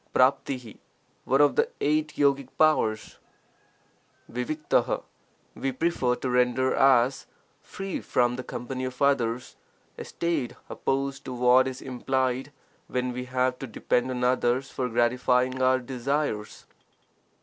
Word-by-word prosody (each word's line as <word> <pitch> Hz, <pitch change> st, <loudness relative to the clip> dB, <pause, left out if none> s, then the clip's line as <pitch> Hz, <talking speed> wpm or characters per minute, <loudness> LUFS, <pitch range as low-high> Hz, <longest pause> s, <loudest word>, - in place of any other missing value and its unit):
Jiifoi:, 130 Hz, -2 st, +1 dB, 0.5 s
one 135 Hz, +2 st, +3 dB
of 145 Hz, -1 st, +4 dB
the -, -, +2 dB
eight 150 Hz, +1 st, 0 dB
yogic 140 Hz, -2 st, +2 dB
powers, 110 Hz, -9 st, +2 dB, 1.1 s
fafatfi: 150 Hz, +6 st, 0 dB, 0.5 s
we 135 Hz, -, -2 dB
prefer 130 Hz, -3 st, 0 dB
to 130 Hz, -, -4 dB
render 125 Hz, +1 st, +2 dB
as 135 Hz, -1 st, +3 dB, 0.3 s
'free 195 Hz, -1 st, -5 dB
from 120 Hz, 0 st, +1 dB
the 130 Hz, -, -5 dB
company 130 Hz, +1 st, -5 dB
of 125 Hz, -1 st, -6 dB
others' 125 Hz, -4 st, 0 dB, 0.2 s
— -, -, -38 dB
a -, -, -4 dB
state 165 Hz, -7 st, -2 dB, 0.2 s
opposed 135 Hz, 0 st, -2 dB
to 130 Hz, -, -5 dB
what 125 Hz, +1 st, +5 dB
is 130 Hz, -1 st, -6 dB
implied 130 Hz, +1 st, -1 dB, 0.4 s
when 125 Hz, 0 st, -2 dB
we 125 Hz, +1 st, -5 dB
have 125 Hz, 0 st, 0 dB
to 135 Hz, -, -5 dB
depend 125 Hz, +2 st, 0 dB
on 125 Hz, -1 st, -3 dB
others 125 Hz, +1 st, +1 dB
for 125 Hz, -1 st, -2 dB
gratifying 125 Hz, +2 st, +1 dB
our 130 Hz, 0 st, +4 dB
desires. 130 Hz, -3 st, -3 dB
130 Hz, 130 wpm, -26 LUFS, 125-135 Hz, 1.1 s, what